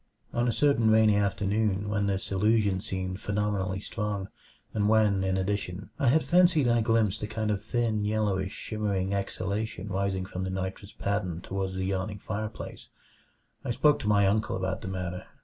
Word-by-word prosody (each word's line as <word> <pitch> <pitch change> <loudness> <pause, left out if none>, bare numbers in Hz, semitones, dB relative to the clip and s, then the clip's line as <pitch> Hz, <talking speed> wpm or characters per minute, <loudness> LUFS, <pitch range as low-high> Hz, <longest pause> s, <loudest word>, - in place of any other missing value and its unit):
On 120 +1 +1
a - - +3
certain 115 -1 +3
rainy 110 -1 +5
afternoon 100 0 +1
when 100 -1 0
this 95 -1 -2
illusion 100 -1 +2
seemed 95 0 -4
phenomenally 100 -2 -1
strong, 105 -1 -3 0.4
and 105 -1 +1
when, 105 -3 +4
in 95 0 +1
addition, 95 0 -3
I 135 - +2
had 155 +6 +4
fancied 175 -6 +4
I 120 -1 +3
glimpsed 110 -2 +2
a 105 - -2
kind 110 0 -1
of 100 -2 -1
thin, 110 -2 0
yellowish, 105 -3 0
shimmering 100 -4 -2
exhalation 100 +1 -3
rising 95 -1 -1
from 95 -1 -5
the 95 - -2
nitrous 95 +2 -4
pattern 100 -4 -2
toward 95 -1 -3
the 95 0 -2
yawning 95 +2 -2
fireplace, 110 +1 -6 0.8
I - - -4
spoke 145 +5 +3
to - - -4
my 100 -1 +4
uncle 105 +2 +1
about 95 0 -2
the - - -6
matter. 90 -1 -4
100 Hz, 170 wpm, -28 LUFS, 95-110 Hz, 0.8 s, rainy